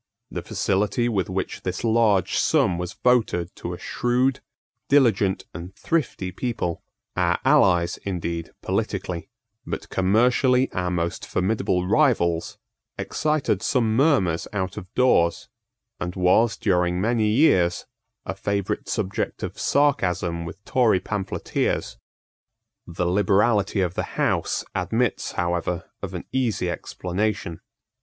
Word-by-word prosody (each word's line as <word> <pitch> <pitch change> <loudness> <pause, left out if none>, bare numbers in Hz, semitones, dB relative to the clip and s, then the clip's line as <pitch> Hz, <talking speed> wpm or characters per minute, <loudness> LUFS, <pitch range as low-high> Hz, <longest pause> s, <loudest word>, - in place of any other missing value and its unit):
The - - -4
facility 105 +4 0
with 100 -7 -1
which 95 0 -3
this 90 -1 -4
large 110 -4 +2
sum 85 - +2
was 90 +2 -4
voted 110 -9 +1
to - - -5
a - - -5
shrewd, 125 +2 0 0.5
diligent 110 -9 +3
and 90 +3 -8
thrifty 150 - -1
people, 95 -4 -3 0.3
our - - +2
allies, 85 -2 +4
indeed, 85 -3 -4
politically, 85 +5 -2 0.3
but - - -6
commercially 125 +7 +3
our 90 -1 -1
most 85 -1 -2
formidable 95 -2 0
rivals, 95 - +2 0.4
excited 150 -10 0
some 115 -4 +1
murmurs 120 - +2
out 95 -3 -2
of 90 +2 -9
doors, 85 -10 +2 0.5
and 90 0 -4
was, 95 +5 +3
during 90 -2 +1
many 110 +2 +1
years, 105 - +3 0.4
a - - -3
favourite 100 0 -2
subject 95 +2 -2
of - - -5
sarcasm 90 - +1
with 95 +5 -10
Tory 120 -7 +3
pamphleteers. 100 -1 -2 0.9
The 85 +1 -2
liberality 100 +2 +2
of 90 -2 0
the - - -5
House - - 0
admits 110 +7 -1
however 85 0 -2
of - - -5
an - - -6
easy 115 -9 0
explanation. 90 -1 -3
95 Hz, 120 wpm, -24 LUFS, 90-115 Hz, 0.9 s, allies